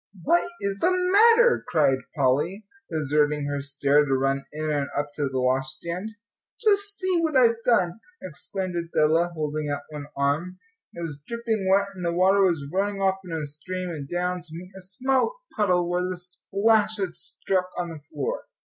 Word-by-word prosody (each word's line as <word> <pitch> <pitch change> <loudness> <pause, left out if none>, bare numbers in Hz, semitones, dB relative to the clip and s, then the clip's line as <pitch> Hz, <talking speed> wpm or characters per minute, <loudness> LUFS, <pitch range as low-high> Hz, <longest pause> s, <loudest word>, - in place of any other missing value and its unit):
"What 345 - +3
is 200 0 -2
the 355 - +3
matter?" 445 +7 +5
cried 140 -5 +3 0.2
Polly, 150 +9 +1 0.2
deserting 150 -1 +1
her 145 0 -2
stair, 140 +1 +2
to 135 -2 +1
run 135 +1 0
in 155 +1 -3
and 145 -2 0
up 145 0 -2
to 145 -2 -1
the 130 -1 -2
washstand. 150 +9 -1 0.5
"Just 405 -2 +2
see 370 -2 +1
what 315 -4 +1
I've 230 -2 +4
done," 185 -5 +2 0.2
exclaimed 185 +2 -5
Adela, 165 0 +2
holding 150 -1 -2
out 145 0 -3
one 150 -1 -7
arm. 150 +6 0 0.4
It 170 - -6
was 145 -4 -6
dripping 230 -4 -2
wet, 200 +1 +3
and 185 -2 -8
the 170 - +1
water 190 +3 +4
was 170 -7 +2
running 200 +1 0
off 190 0 +1
in 180 - -9
a 160 -2 -2
stream 180 +5 -5
and 145 -4 -6
down 180 0 -1
to 170 - -16
meet 180 +2 -9
a 190 - -9
small 260 - 0 0.2
puddle 180 -4 +2
where 175 +1 0
the 185 - -3
splash 205 +4 +1
had 190 -4 -3
struck 185 -1 -1
on 175 -1 -2
the 160 - -8
floor. 145 -3 -3
175 Hz, 180 wpm, -25 LUFS, 150-200 Hz, 0.5 s, matter